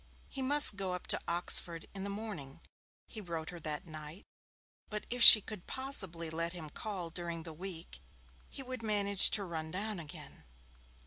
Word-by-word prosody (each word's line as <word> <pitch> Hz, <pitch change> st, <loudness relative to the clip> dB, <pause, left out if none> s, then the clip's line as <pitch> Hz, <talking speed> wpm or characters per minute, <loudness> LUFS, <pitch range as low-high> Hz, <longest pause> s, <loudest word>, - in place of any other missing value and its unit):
He 270 Hz, -, -7 dB
must 275 Hz, -5 st, +5 dB
go 190 Hz, -2 st, -5 dB
up 180 Hz, -, -8 dB
to -, -, -5 dB
Oxford 170 Hz, -1 st, 0 dB
in 195 Hz, -1 st, -9 dB
the 200 Hz, -, -6 dB
morning, 200 Hz, -10 st, -9 dB, 0.5 s
he 220 Hz, -, -10 dB
wrote 165 Hz, -4 st, -7 dB
her 175 Hz, -, -11 dB
that 155 Hz, +2 st, -5 dB
night, 155 Hz, +2 st, -12 dB, 0.6 s
but 210 Hz, -1 st, -7 dB
if 245 Hz, 0 st, -5 dB
she 215 Hz, -, +12 dB
could 205 Hz, -3 st, -11 dB
possibly 195 Hz, -12 st, -1 dB
let 165 Hz, +1 st, -5 dB
him 160 Hz, -4 st, -10 dB
call 185 Hz, -5 st, -7 dB
during 170 Hz, -1 st, -7 dB
the 165 Hz, -1 st, -10 dB
week 175 Hz, 0 st, -10 dB, 0.5 s
he 270 Hz, -, -9 dB
would 255 Hz, -2 st, -8 dB
manage 200 Hz, -3 st, +3 dB
to 205 Hz, -, +1 dB
run 160 Hz, -3 st, -7 dB
down 200 Hz, +3 st, -6 dB
again. 155 Hz, -3 st, -13 dB
180 Hz, 175 wpm, -31 LUFS, 165-210 Hz, 0.6 s, she